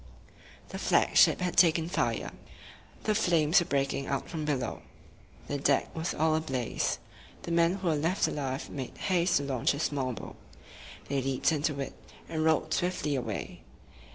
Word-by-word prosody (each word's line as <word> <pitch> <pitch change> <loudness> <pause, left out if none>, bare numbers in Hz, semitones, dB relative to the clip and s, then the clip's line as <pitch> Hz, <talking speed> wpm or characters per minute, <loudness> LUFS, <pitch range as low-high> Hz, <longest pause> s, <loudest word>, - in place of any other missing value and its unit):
The - - -6
flag - - +2
ship - - +6
had 180 -2 -1
taken 165 -2 +4
fire. 175 - -1 0.7
The 215 - +2
flames 170 -5 +4
were 175 - -2
breaking 135 -1 -1
out 140 - -2
from 155 -2 -4
below. 140 -4 -2 0.6
The 145 - -3
deck 140 0 +1
was 160 +1 -2
all 160 +1 +2
ablaze. 135 -7 -1 0.5
The - - -5
men 170 +1 +3
who 190 -2 -4
were 160 - +3
left 165 +6 +1
alive 135 -2 -3
made 130 -3 -6
haste 180 -2 +2
to 145 - -1
launch 135 0 0
a - - -5
small 140 -4 -1
boat. - - -9 0.7
They 140 -1 0
leaped 135 +3 +1
into 150 -2 -1
it, 135 - -4 0.3
and 160 -1 -2
rowed 160 0 +2
swiftly 175 -5 0
away. 115 -6 -4
150 Hz, 165 wpm, -29 LUFS, 135-170 Hz, 0.7 s, ship